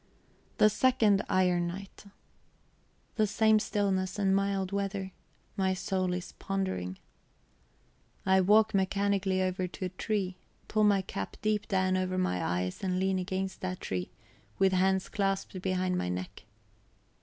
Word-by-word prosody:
The - - +6
second 215 -3 +3
iron 180 -2 +2
night; 195 +4 -8 1.1
the 215 -1 +3
same 220 +1 +4
stillness 190 -3 -1
and 195 -1 +2
mild 195 -1 0
weather. 200 -1 -2 0.4
My 190 -2 +1
soul 185 -1 -1
is 180 - -6
pondering. 185 - -3 1.3
I 190 0 +5
walk 215 +3 +4
mechanically 195 -1 +1
over 185 0 -1
to 185 +1 -6
a - - -2
tree, 190 -1 -2 0.3
pull 215 0 +2
my 200 -2 +3
cap 100 - -5
deep 215 -1 0
down 185 -2 +1
over 185 0 -1
my 90 - 0
eyes, 90 - -2
and 185 -1 0
lean 190 0 +1
against 190 +1 -3
that 185 -1 -3
tree, 90 -1 -3 0.5
with 190 -1 +3
hands 190 0 +2
clasped 195 -2 -2
behind 185 -1 0
my 90 - -2
neck. 90 +1 -5
190 Hz, 140 wpm, -30 LUFS, 185-200 Hz, 1.3 s, The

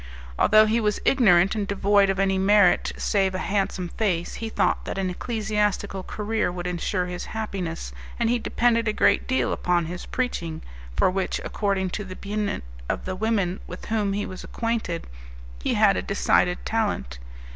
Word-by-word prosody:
Although 215 +1 +6
he 220 +2 +2
was 210 -1 0
ignorant 195 -8 +5
and 210 -2 -2
devoid 200 0 +3
of 195 - 0
any 195 -1 +2
merit 200 -1 +4
save 190 -2 +1
a - - 0
handsome 195 -2 -1
face, 175 -5 -1
he 225 - -3
thought - - +1
that - - -4
an 190 -1 -1
ecclesiastical 210 -2 -1
career 210 0 -2
would 175 0 -6
insure 180 +1 -1
his 180 0 -5
happiness, 185 -6 -4 0.3
and 235 - +2
he 240 +1 +2
depended 230 0 +1
a 215 - +1
great - - +3
deal 260 - +1
upon 175 -1 +1
his 175 +2 -6
preaching, 175 -11 -3 0.3
for 185 - +3
which, 190 0 -1
according 195 -3 -1
to 210 - -3
the 190 -1 -8
opinion 205 - -3 0.3
of - - -2
the 185 - -3
women 200 -3 0
with - - -8
whom 210 -3 0
he 205 +1 -1
was 185 -1 -8
acquainted, 230 -7 -2 0.6
he - - 0
had - - +5
a - - -1
decided - - +1
talent. - - -1
195 Hz, 175 wpm, -25 LUFS, 180-215 Hz, 0.6 s, Although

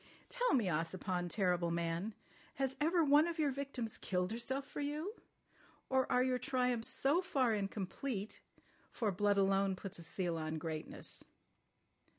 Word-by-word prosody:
"Tell - - +2
me, 235 -5 +3
Ossipon, 175 +2 -1
terrible 180 -2 +1
man, 170 +5 -1 0.4
has 270 -1 -1
ever 335 +2 +4
one 295 +2 +6
of 340 0 -3
your 300 -3 +2
victims 260 -4 -3
killed 180 0 -1
herself 265 +4 -2
for - - -7
you—or 290 - -4
are 250 - +4
your 255 -1 +1
triumphs 250 -2 +1
so 290 +7 +3
far 265 -10 +2
incomplete—for 205 +1 -4
blood 205 +2 +2
alone 195 0 +3
puts 185 -1 -5
a - - -6
seal 170 -1 -1
on 155 0 -2
greatness? 155 0 -4
220 Hz, 140 wpm, -36 LUFS, 180-275 Hz, 0.4 s, one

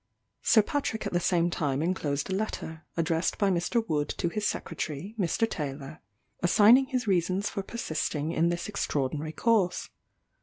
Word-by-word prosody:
Sir 220 - +5
Patrick 250 -3 -2
at - - -3
the 175 - +3
same 175 -1 +2
time 145 -3 -1
inclosed 150 -5 -1
a 190 - -3
letter, 165 -6 -4
addressed 165 0 0
by 200 -2 +2
Mr. 205 +6 0
Wood 150 -3 0
to 170 - 0
his 210 +3 -1
Secretary, 155 +7 -4
Mr. 195 +5 +1
Taylor, 145 -4 -5 0.4
assigning 215 +9 +6
his 255 -4 -1
reasons 190 +1 +1
for 200 - -3
persisting 155 -7 -2
in 170 0 +2
this 175 0 -2
extraordinary 150 -6 -2
course. 205 -3 +1
175 Hz, 155 wpm, -28 LUFS, 155-210 Hz, 0.4 s, assigning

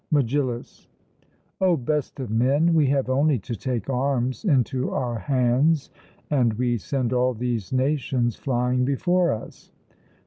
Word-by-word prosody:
MEGILLUS: 135 -4 -1 0.7
O 185 -3 +3
best 145 +2 -2
of 125 -5 -5
men, 140 +9 +2
we 155 -4 +4
have 135 -1 +1
only 140 +2 +2
to 115 +3 -6
take 125 0 -3
arms 130 - -1
into 130 - +1
our 120 -4 -2
hands, 130 - +1 0.4
and 125 -6 +2
we 120 +1 0
send 130 +2 -2
all 125 0 +1
these 120 -3 -3
nations 130 -3 0
flying 125 -1 0
before 175 +7 +1
us. 110 - -8
130 Hz, 135 wpm, -24 LUFS, 120-140 Hz, 0.7 s, we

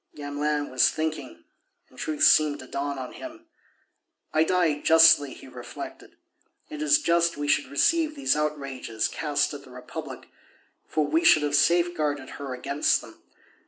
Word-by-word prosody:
Gamelin 145 0 -3
was 130 - +3
thinking, 155 - -5 0.4
and 130 - -18
truth 155 -1 -2
seemed 150 -2 +5
to 130 - -11
dawn 140 +2 -4
on 130 -1 -7
him. 325 +1 -11 0.9
"I 155 - +4
die 165 -4 +1
justly," 160 -3 +5
he - - -14
reflected. - - -10 0.6
"It 150 - -7
is 150 -2 +4
just 170 -1 +1
we 145 0 -3
should 145 - +1
receive 310 - +1
these 275 - +1
outrages 140 -7 -3
cast 145 -1 -1
at 140 -1 -9
the 130 - -16
Republic, 125 +2 -9 0.6
for 155 -1 0
we 325 - 0
should 155 - +5
have 145 -1 -2
safeguarded 155 -3 +1
her 135 -2 -5
against 140 +4 0
them. - - -15
150 Hz, 155 wpm, -25 LUFS, 140-160 Hz, 0.9 s, seemed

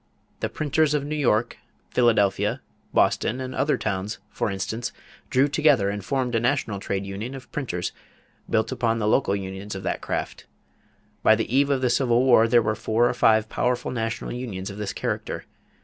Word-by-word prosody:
The - - -2
printers 150 0 +1
of 145 -1 -1
New 150 +1 -3
York, 120 -5 +1 0.3
Philadelphia, 110 -5 +2 0.3
Boston, 125 - +2
and 130 0 -5
other 150 - +1
towns, 100 0 -3
for - - -1
instance, 110 +5 -3 0.4
drew 135 0 +4
together 145 -9 +3
and 100 -1 -5
formed 130 +1 -1
a 115 - +3
national 120 -4 0
trade 100 0 -3
union 105 +7 -5
of 130 - -11
printers 90 -12 -3 0.6
built 110 0 +1
upon 115 -1 0
the 105 -2 -1
local 105 -3 +2
unions 95 +1 -5
of 95 - -6
that - - -2
craft. - - -4 0.7
By - - +6
the 125 - -2
eve 140 +1 +4
of 135 -2 +1
the 125 - +2
Civil 120 -1 +3
War 120 -3 +6
there 120 0 +4
were 110 - +1
four 110 +2 +1
or - - 0
five 110 -2 +4
powerful 125 +2 -1
national 115 -2 -3
unions 105 -6 -5
of 100 - -9
this 105 -2 -2
character. - - -3
115 Hz, 180 wpm, -25 LUFS, 105-130 Hz, 0.7 s, By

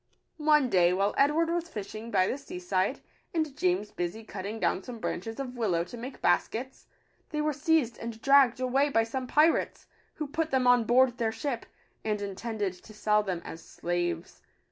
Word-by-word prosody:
One 300 -3 +4
day, 180 -5 +4
while 200 +2 +1
Edward 305 +4 +3
was 345 0 -2
fishing 215 -2 -6
by 190 -4 +3
the - - -1
sea 275 - -8
side, 185 +6 -1 0.3
and 310 -4 0
James 190 -2 0
busy 175 +5 -4
cutting 215 +1 -6
down - - +1
some 240 +3 -8
branches 225 +1 -4
of 255 -2 -5
willow 190 -8 +1
to 180 - -10
make 250 +3 -8
baskets, 235 +8 0 0.4
they 300 - -3
were 300 0 +1
seized 290 -5 +1
and 230 -1 -6
dragged 275 -1 +5
away 265 +3 +2
by 225 -5 +3
some 255 +3 -4
pirates, 310 +5 +2 0.3
who 305 - -3
put 320 +3 -2
them 265 -3 +1
on 245 -2 +5
board 245 +1 +4
their 225 -1 +1
ship, 245 0 -4 0.4
and 215 -1 -1
intended 205 0 -3
to 215 - -14
sell 210 0 +3
them 185 -4 -4
as 165 - -8
slaves. 175 0 -3
230 Hz, 185 wpm, -29 LUFS, 200-275 Hz, 0.4 s, dragged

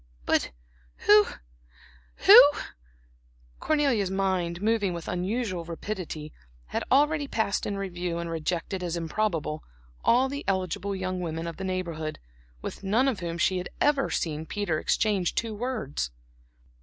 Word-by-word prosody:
"But - - +2 0.6
who 210 0 +7 1.0
who" 250 - +12 1.2
Cornelia's 275 -11 +2
mind, 185 -3 0
moving 205 -2 +1
with 170 -1 -6
unusual 185 0 -2
rapidity, 165 -3 -6 0.4
had - - -2
already 295 +2 +3
passed 220 -6 -1
in 200 - -2
review 180 -3 -3
and 170 0 -3
rejected 165 +3 -2
as 175 -1 -2
improbable 165 -3 -1 0.4
all 250 +3 +4
the 280 +2 -5
eligible 190 +1 -1
young 185 -1 -3
women 165 -1 -3
of 170 -1 -5
the 190 - -5
Neighborhood, 170 -5 -3 0.5
with - - -6
none 225 +7 +2
of 255 -7 0
whom 170 -1 -4
she 180 +2 +2
had 180 - -5
ever 285 -2 +2
seen 160 -1 -2
Peter 200 -7 -1
exchange 200 -3 +1
two 225 -1 -1
words. 215 - -3
185 Hz, 135 wpm, -27 LUFS, 170-215 Hz, 1.2 s, who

